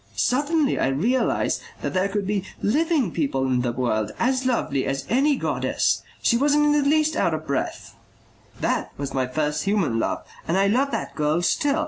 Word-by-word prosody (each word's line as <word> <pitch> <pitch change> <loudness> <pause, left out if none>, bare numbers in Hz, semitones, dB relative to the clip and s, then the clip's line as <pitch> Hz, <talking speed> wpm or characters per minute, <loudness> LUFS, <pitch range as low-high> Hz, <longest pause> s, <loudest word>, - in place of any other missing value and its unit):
Suddenly 290 +3 +1
I - - +2
realized 215 - +1 0.2
that - - -2
there 185 +1 +1
could 200 0 -2
be 200 -1 -1 0.2
living 290 - +1
people 135 -5 -1
in 130 -1 +1
the 120 -1 0
world 110 -4 -1
as 255 +1 +1
lovely 145 - 0
as 135 0 -2
any 280 +4 +3
goddess.... - - 0 0.2
She 235 - +4
wasn't 295 +3 +3
in 295 - +4
the 295 0 +3
least 310 0 +2
out 165 - +1
of 155 0 -6
breath. 140 -3 -3 0.6
"That - - -1
was 140 -1 -4
my 130 -1 0
first 150 +4 -1
human 195 - +1
love. - - -1 0.2
And 170 - +1
I 195 - +3
love 255 +8 +2
that - - -4
girl 155 +3 0
still. 285 - +1
200 Hz, 185 wpm, -23 LUFS, -, 0.6 s, She